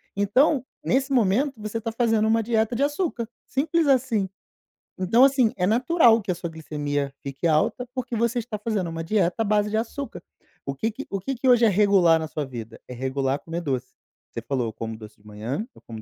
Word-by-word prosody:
Então, 255 +7 +3 0.2
nesse 270 +2 +1
momento, 250 +4 +2
você 215 +1 -3
está 225 0 -3
fazendo 225 -2 +2
uma 225 0 +2
dieta 225 +1 +1
de 275 - +1
açúcar, 290 -6 -1 0.2
simples 315 +3 0
assim. 240 -8 +2 0.7
Então 210 +7 +4
assim, 265 -5 +4
é 180 - 0
natural 235 - +4
que 195 - -12
a - - -1
sua 170 -1 -5
glicemia 145 -3 -3
fique 140 +5 -2
alta, 160 +10 +1
porque 250 -1 -3
você 235 +2 +1
está 220 -2 -5
fazendo 205 -5 -2
uma 165 0 -4
dieta 180 -1 +1
à - - +4
base 210 0 +2
de 220 - 0
açúcar. 250 +5 -4 0.4
O 140 - -3
que 220 +10 -1
que 275 +6 -8
o 195 - -2
que 270 +6 -3
que 255 +2 -2
hoje 245 -1 +6
é 220 - +5
regular 190 -5 +4
na 160 - -4
sua 150 -2 -4
vida? 115 -3 -8
É 125 - -7
regular 135 +2 -1
comer 170 +1 -5
doce, 130 -5 -2 0.4
você - - -6
falou: 130 -4 -1
"Eu 110 - -5
como 115 -1 -6
doce 105 -1 -12
de - - -28
manhã, 110 - -4
eu - - -18
como 110 -2 -9
210 Hz, 215 wpm, -24 LUFS, 155-240 Hz, 0.7 s, hoje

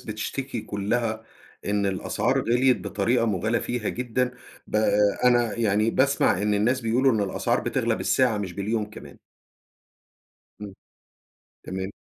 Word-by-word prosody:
بتشتكي 115 +3 -4
كلّها 110 +2 -2 0.4
إن 100 -1 +1
الأسعار 120 +7 0
غِليت 125 +1 +2
بطريقة 115 +4 0
مُبالغ 110 +3 0
فيها 120 -3 -3
جدًا، 125 +1 -1 0.4
ب - - -2
آآ، 110 - +3 0.4
أنا 120 -3 +3
يعني 110 -1 +2
باسمع 130 -8 +2
إن 105 0 +1
الناس 120 +6 +1
بيقولوا 125 +3 +2
إن 110 - +1
الأسعار 100 -2 0
بتغلى - - 0
بالساعة 125 -5 +1
مش 95 -3 -4
باليوم 105 +2 -2
كمان. 70 -8 -12 1.4
إمم. 100 -2 -8 0.9
تمام. 95 +1 -4
110 Hz, 130 wpm, -25 LUFS, 105-120 Hz, 1.4 s, آآ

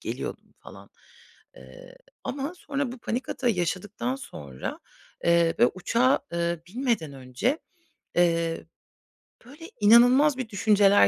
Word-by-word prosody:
geliyordum - - -6
falan. - - -14 0.7
Eee, - - -14 0.3
ama 280 +4 -3
sonra 280 -6 -3
bu 255 - -9
panik 240 +2 -3
atağı 250 -2 0
yaşadıktan 195 +6 -2
sonra, 70 - -7 0.4
eee, 170 -1 +4
ve 240 - +7
uçağa, 235 +8 +2
eee, 170 -1 -1
binmeden 230 - -1
önce, 135 - -2 0.6
eee, 165 -2 +1 0.8
böyle, 300 +6 -12
inanılmaz 250 +6 +6
bir 250 -4 -4
düşünceler 205 -1 +5
225 Hz, 115 wpm, -26 LUFS, 170-260 Hz, 0.8 s, ve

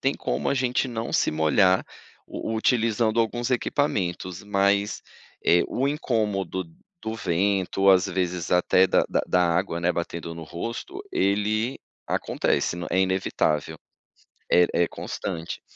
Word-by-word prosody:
tem - - +1
como 65 +4 -2
a - - +2
gente 125 0 0
não 115 -1 -4
se - - +2
molhar 80 +5 +3 0.4
u 115 - -4
utilizando 115 0 +2
alguns 120 +2 -1
equipamentos, 95 -9 -1
mas, 100 0 +1 0.4
eh, 85 +1 +5
o 135 +2 -1
incômodo 105 -10 -1 0.4
do 110 0 -3
vento, 95 0 +1
às 90 -1 +5
vezes 90 -1 -2
até 90 +1 +4
da - - +3
da - - +1
da 90 0 +3
água, 90 -2 -1
né, 90 +1 +2
batendo 85 -1 -4
no 85 - -8
rosto, 115 - -6
ele 105 +5 0 0.3
acontece, - - 0
é 95 - +2
inevitável, 80 -5 0 0.7
é 90 0 +6 0.2
é 85 - +3
constante. 80 0 -5
95 Hz, 135 wpm, -25 LUFS, 90-115 Hz, 0.7 s, é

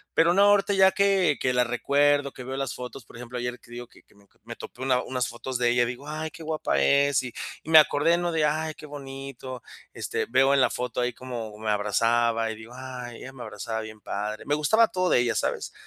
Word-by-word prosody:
Pero 170 +2 +4
no, 200 - +6
ahorita 205 0 +4
ya 190 0 +6
que 195 -7 +2
que 130 -1 +1
la 125 - +3
recuerdo, 140 +3 +2
que 125 - -9
veo 130 +1 -5
las 135 -1 -3
fotos, 125 0 -8
por - - -17
ejemplo, 125 +1 -6
ayer 120 0 -3
te 120 - -20
digo 120 0 -7
que - - -21
que - - -27
me 100 0 -24
to - - -34
me 120 +1 -8
topé 125 - -9
una 130 -1 +2
unas 125 -1 -2
fotos 125 +2 -5
de 120 -1 +2
ella, 120 0 +3
digo: 125 +3 -7
"Ay, 155 +1 -4
qué 170 0 -12
guapa 155 0 -1
es" 140 -1 +3
y 125 -2 -7 0.3
y - - -10
me 160 - +11
acordé, 150 +2 +3
¿no?, 175 0 -1
de: 160 -2 +2
"Ay, 155 +1 -1
qué - - -11
bonito", 135 -3 -8 0.3
este, - - -3
veo 135 +3 +4
en 140 - +4
la 125 - +4
foto 125 0 -3
ahí 125 0 -1
como 115 -4 -7
me 110 0 -2
abrazaba 115 +2 +1
y - - -6
digo: 110 +2 -12
"Ay, 125 -2 -7
ella 130 - -9
me 130 - -11
abrazaba 110 +1 -5
bien 110 -1 -10
padre". 105 +1 -4
Me 145 - 0
gustaba 185 +10 +4
todo 185 -2 -1
de - - +4
ella, 120 -2 +1
¿sabes? - - -2
130 Hz, 245 wpm, -26 LUFS, 120-150 Hz, 0.3 s, me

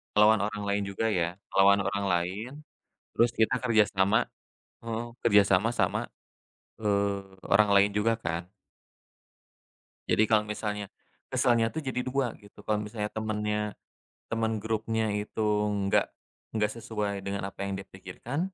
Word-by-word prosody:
Ngelawan 105 0 +6
orang 105 0 -4
lain 100 0 +1
juga 105 +3 -1
ya, 90 -4 0 0.2
ngelawan 100 +1 +6
orang 100 0 -1
lain, 90 +7 -1 0.6
terus 115 +1 +3
kita 110 -1 +2
kerjasama 105 -3 +2 0.5
heeh. 115 0 -4 0.2
Kerjasama 100 -1 +4
sama, - - 0 0.7
eee, 100 -2 0 0.2
orang 105 +1 +4
lain 100 +1 +5
juga 105 +3 +2
kan. 85 -4 -4 1.6
Jadi - - +4
kalau 110 -1 +4
misalnya, 105 -1 -3 0.5
kesalnya 120 -3 +3
tuh 160 - -3
jadi 130 -1 -2
dua 130 -2 0
gitu. 100 -1 -19
Kalau 105 -1 +1
misalnya 105 0 -4
temennya, 105 -1 -1 0.7
temen 115 0 0
grupnya 110 0 -1 0.2
itu 105 +1 -5 0.5
nggak - - +4 0.5
nggak 105 -1 +1
sesuai 105 -3 -3
dengan 100 0 -3
apa 100 - -25
yang 100 - -3
dia 95 - -8
pikirkan, 95 - -6
105 Hz, 135 wpm, -28 LUFS, 100-110 Hz, 1.6 s, Ngelawan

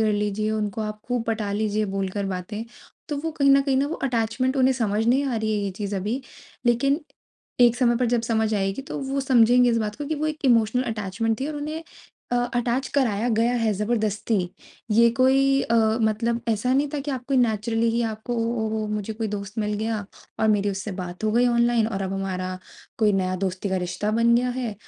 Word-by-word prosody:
कर 215 -1 +2
लीजिए 210 +1 -1
उनको 215 -1 -2
आप 210 0 -5
खूब 245 -2 -1
पटा 220 -2 -1
लीजिए 215 0 0
बोलकर 195 +1 -2
बातें। 195 +4 -4 0.4
तो 295 - -2
वो 325 +2 -3
कहीं 280 -3 +3
न 275 0 +6
कहीं 275 -1 +1
ना 275 +2 +2
वो 320 - -3
अटैचमेंट 245 +3 0
उन्हें 260 0 +4
समझ 220 -2 0
नहीं 265 +4 +3
आ 250 -4 -1
रही 220 0 -1
है 210 -1 0
ये 200 - -2
चीज़ 200 +1 -4
अभी। 210 +7 -2 0.5
लेकिन 275 +6 +2 0.6
एक 240 -1 +6
समय 240 -2 +3
पर 245 0 +1
जब 240 0 +1
समझ 220 -1 0
आएगी 195 +4 -1
तो 280 - -6
वो 270 0 -2
समझेंगे 245 -2 +5
इस 230 - +2
बात 210 -1 -3
को 290 0 -5
कि 315 - -1
वो 305 +1 -2
एक 310 -1 -4
इमोशनल 235 -1 +3
अटैचमेंट 215 +2 -2
थी 270 - -1
और 305 - -4
उन्हें 305 +2 -4 0.5
अ 245 - +3 0.2
अटैच 245 +2 0
कराया 240 -5 +1
गया 235 +2 +2
है 225 -2 +1
ज़बरदस्ती। 215 +1 -1 0.6
ये 230 +2 +6
कोई 270 +1 +4
अ, 230 - 0 0.3
मतलब 230 +2 +1
ऐसा 225 +3 +1
नहीं 280 +2 +2
था 295 - -1
कि 285 +1 -4
आपको 260 +1 -3
नेचुरली 225 -1 +1
ही 235 +1 0
आपको 220 +3 -5
वो 230 - 0 0.2
ओहो 215 0 -2
मुझे 210 0 -3
कोई 220 0 -3
दोस्त 205 +1 -6
मिल 210 -1 0
गया 220 -1 -2 0.4
और 220 - +3
मेरी 205 -1 +2
उससे 195 +1 -4
बात 180 +3 -6
हो 215 - +2
गई 240 +2 +4
ऑनलाइन 235 -1 +3
और 195 -3 -3
अब 190 0 -3
हमारा 185 -1 -3 0.4
कोई 210 -2 +3
नया 185 -1 0
दोस्ती 190 +1 -2
का 190 - 0
रिश्ता 210 +4 -2
बन 230 +1 +3
गया 250 +1 +1
है 235 -5 -3
225 Hz, 215 wpm, -24 LUFS, 210-250 Hz, 0.6 s, न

